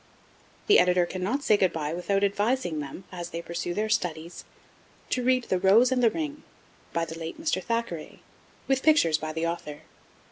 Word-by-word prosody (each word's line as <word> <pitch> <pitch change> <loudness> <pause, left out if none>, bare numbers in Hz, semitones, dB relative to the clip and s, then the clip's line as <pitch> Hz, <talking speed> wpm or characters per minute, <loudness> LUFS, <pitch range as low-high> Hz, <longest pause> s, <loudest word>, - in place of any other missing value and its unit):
The 420 - +6
Editor 180 -1 +3
cannot 190 +11 -2
say 215 - +4
'good 185 -3 +2
bye' 155 -1 -3
without 195 +3 0
advising 200 -4 0
them, 145 +6 -7
as 175 -2 -6
they 170 - -5
pursue 170 +1 -4
their 215 +2 0
studies, 170 -5 -2 0.7
to 250 - +1
read 255 0 +2
The 185 -5 -1
Rose 220 +7 +5
and 255 -1 +2
the 235 - +5
Ring, 300 +1 -4 0.5
by 170 0 -1
the 160 0 -8
late 165 - -6
Mr. 320 -1 -1
Thackeray, 230 -9 -4 0.5
with 270 -1 +1
pictures 220 - +4
by 155 0 -4
the 160 +1 -2
author. 150 -3 -4
185 Hz, 180 wpm, -27 LUFS, 165-245 Hz, 0.7 s, The